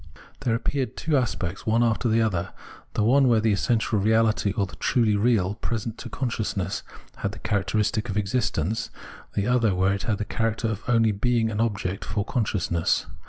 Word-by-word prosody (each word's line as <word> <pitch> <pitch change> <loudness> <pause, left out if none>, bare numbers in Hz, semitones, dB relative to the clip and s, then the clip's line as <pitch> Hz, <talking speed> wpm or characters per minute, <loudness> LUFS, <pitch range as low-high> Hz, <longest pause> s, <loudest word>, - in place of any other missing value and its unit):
There 115 -2 0
appeared 130 +2 -2
two 160 -2 0
aspects, 100 -8 -1
one 115 +2 +3
after 115 +1 +1
the 115 +1 +3
other; 95 -4 -1 0.4
the 105 - +2
one 130 +4 +5
where 115 -2 +4
the 110 0 +2
essential 110 +1 +1
reahty 110 0 +2
or 100 - +2
the 95 - -11
truly 115 -5 +2
real 100 -3 +2
present 115 0 -4
to - - -7
consciousness 110 -6 -2 0.4
had - - -3
the - - -9
characteristic 105 +3 0
of 100 - -2
existence, 105 -1 -1 0.5
the 100 - +1
other 115 -5 +2
where 95 +1 +2
it 100 - -3
had 105 - +1
the 105 - -3
character 115 +1 -1
of 110 -1 -3
only 115 -2 +4
being 115 +2 +1
an 105 +1 -1
object 100 -4 -1
for 100 -1 -2
consciousness. 95 -9 0
110 Hz, 180 wpm, -25 LUFS, 100-115 Hz, 0.5 s, one